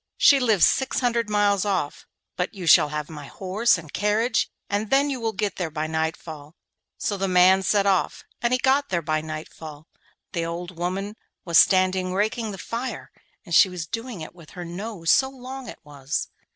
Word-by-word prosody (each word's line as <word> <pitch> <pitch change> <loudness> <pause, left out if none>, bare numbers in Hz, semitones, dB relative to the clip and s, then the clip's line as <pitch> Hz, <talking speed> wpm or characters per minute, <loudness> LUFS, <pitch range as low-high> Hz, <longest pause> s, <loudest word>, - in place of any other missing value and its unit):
She 280 - +6
lives 220 -8 +4
six 265 -1 +1
hundred 235 -3 0
miles 205 -2 +2
off, 185 -8 -2 0.3
but 180 +4 -3
you 185 -3 -6
shall 155 -1 +6
have 150 0 -4
my 150 -3 -9
horse 195 +7 +1
and 160 -3 -11
carriage, 220 +3 +1 0.2
and 205 +1 -2
then 280 +1 +3
you 260 -3 -4
will 225 -1 0
get 205 -1 -3
there 175 -3 -2
by 155 0 -3
nightfall.' 160 -1 -4 0.4
So 205 - -2
the 195 0 -1
man 185 +1 +5
set 200 +1 +2
off 195 -2 +1 0.2
and 240 - +1
he 255 - +3
got 270 +3 +2
there 170 -3 -1
by 155 0 0
nightfall. 155 -1 -8 0.5
The 170 - -2
old 170 +2 -5
woman 190 +5 -3 0.3
was 170 -2 +5
standing 185 -1 +3
raking 220 +3 -1
the 195 - -6
fire, 235 +6 -5 0.3
and 170 - -7
she 190 - +7
was 180 -3 -5
doing 230 0 -6
it 155 - -8
with 170 -4 -16
her 175 - -5
nose, 175 -1 -2
so 265 - +4
long 265 0 -9
it - - -9
was. 145 -1 -4
190 Hz, 190 wpm, -24 LUFS, 165-225 Hz, 0.5 s, she